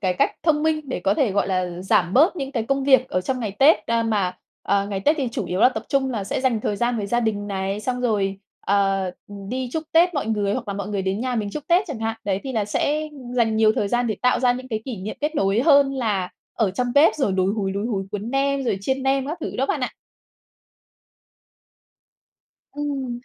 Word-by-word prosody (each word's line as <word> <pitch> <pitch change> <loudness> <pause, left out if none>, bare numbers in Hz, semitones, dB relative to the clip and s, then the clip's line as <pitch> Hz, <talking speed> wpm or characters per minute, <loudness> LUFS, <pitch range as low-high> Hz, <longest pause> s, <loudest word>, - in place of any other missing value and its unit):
cái 185 -3 0
cách - - +1
thông 305 -2 +2
minh 315 -1 +1
để 255 - -3
có 195 +3 +2
thể, 235 -2 +2
gọi 200 0 +1
là, 180 -2 -2
giảm 185 -1 +2
bớt 320 +7 +5
những 275 -2 -4
cái 235 -5 -1
công 275 +3 -1
việc 260 -2 +4
ở 185 - 0
trong 255 +7 -2
ngày 215 - -2
Tết, 270 -7 +5
ơ, 230 0 +1
mà, 205 -5 0 0.3
ờ, 200 0 +1
ngày 195 -2 -3
Tết 300 +10 +3
thì 260 -3 0
chủ 205 - -2
yếu 180 +3 -2
là - - +7
tập 260 - -5
trung 265 -1 +1
là 210 -5 -3
sẽ 200 - -2
dành 245 -5 +1
thời 205 - -2
gian 240 +2 0
với 205 -2 -2
gia 240 +3 +1
đình 205 -3 -1
này, 195 +1 -3
xong 250 +2 -2
rồi, 200 -5 0 0.3
ờ, 195 -1 +2 0.2
ừm, 200 -1 -9
đi 255 +1 -3
chúc 320 - -2
Tết 345 +2 +4
mọi 285 - -1
người 205 -2 0
hoặc 235 -1 -4
là 200 - -2
mọi 200 0 -4
người 200 -2 -2
đến 190 +3 -1
nhà 250 -1 -1
mình 210 -3 -2
chúc 295 +6 -6
Tết 355 +4 +4
chẳng 285 -8 -5
hạn. 225 0 -2
Đấy, 195 -1 -1
thì 265 - -4
là 220 -4 0
sẽ 300 +9 -1 0.3
dành 225 -2 +2
nhiều 220 -1 +5
thời 205 - -1
gian 240 +2 +1
để 215 -3 -1
tạo 250 - +3
ra 250 -1 +4
những 255 +1 -7
cái 220 -2 -3
kỷ 255 -5 -5
niệm 195 +3 -6
kết 300 +2 -1
nối 195 -1 +2
hơn 280 -2 +5
là 205 -8 -1 0.3
ở 210 -5 +2
trong 245 +6 -1
bếp 290 +3 +6
rồi 265 -10 0
lúi 190 +1 +1
húi, 195 -3 -2
lúi 200 +3 -2
húi 195 -5 -2
cuốn 210 +3 -4
nem, 275 0 0
rồi 200 -5 0
chiên 265 +5 -1
nem 270 0 +1
các 315 +4 -4
thứ - - -5
đó 270 - +1
bạn - - -1
ạ. - - -2 2.8
Ừm. 275 -4 -3
225 Hz, 250 wpm, -23 LUFS, 200-270 Hz, 2.8 s, là